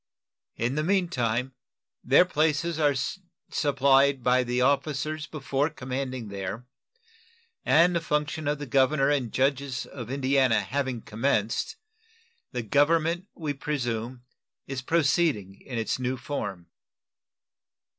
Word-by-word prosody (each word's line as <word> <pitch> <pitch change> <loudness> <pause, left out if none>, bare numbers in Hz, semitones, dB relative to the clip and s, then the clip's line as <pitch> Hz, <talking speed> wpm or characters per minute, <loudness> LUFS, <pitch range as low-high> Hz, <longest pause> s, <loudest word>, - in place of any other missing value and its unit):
In 120 +3 -1
the 150 +2 0
mean 185 0 +2
time, 120 +1 -1 0.5
their 140 +8 +6
places 160 0 0
are 145 -2 +3 0.6
supplied 140 -2 +3
by 125 +1 +3
the 125 0 -1
officers 145 +3 0
before 145 -1 -1
commanding 130 -4 -5
there, 100 +4 -5 1.0
and 170 +3 +4
the 170 - +1
function 150 -1 -1
of 150 +1 +1
the 145 - -6
governor 135 +2 +3
and 130 -6 0
judges 135 -1 0
of 120 -4 -8
Indiana 130 -4 +2
having 130 +3 -3
commenced, 110 -1 -1 0.8
the 120 - -3
government, 165 - +2
we 155 -4 -3
presume, 125 -4 -3 0.4
is 135 -1 -4
proceeding 140 - +1
in 125 -3 -6
its 115 +2 -1
new 130 +1 -1
form. 120 -9 -5
135 Hz, 120 wpm, -27 LUFS, 125-150 Hz, 1.0 s, their